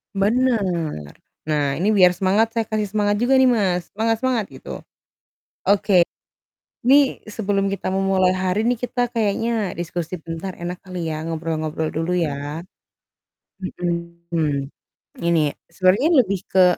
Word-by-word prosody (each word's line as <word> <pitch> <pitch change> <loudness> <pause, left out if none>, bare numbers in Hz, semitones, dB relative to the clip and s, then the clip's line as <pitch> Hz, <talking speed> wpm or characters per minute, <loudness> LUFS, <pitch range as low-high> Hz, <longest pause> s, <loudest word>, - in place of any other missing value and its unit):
Bener. 195 - +1 0.4
Nah 150 -1 +1 0.2
ini 190 - +1
biar 180 -2 +7
semangat 195 +5 +2
saya 225 -1 -1
kasih 215 -1 -1
semangat 205 -1 +1
juga 245 +3 +3
nih, 260 - +6
Mas, 190 -8 +1
semangat 225 +1 +1
semangat! 245 -4 0
Gitu. - - -12 1.0
Oke, 195 -3 +4 0.8
nih 275 0 +5
sebelum 200 -2 0
kita 195 -1 -3
memulai 190 -1 +2
hari 185 +3 0
nih, 240 0 +1
kita 245 -1 -1
kayaknya 220 -1 0
diskusi 175 0 -4
bentar 165 +3 -6
enak 175 +1 -5
kali 180 -3 -5
ya, 155 - -4
ngobrol-ngobrol 160 -1 -2
dulu 165 +3 -1
ya. 150 -1 -2 1.0
Mhm, 170 -5 -2 0.6
ini 170 -1 +3 0.3
sebenarnya 190 - +3 0.2
lebih 195 -2 -2
ke 185 -1 +5
185 Hz, 130 wpm, -22 LUFS, 170-215 Hz, 1.0 s, biar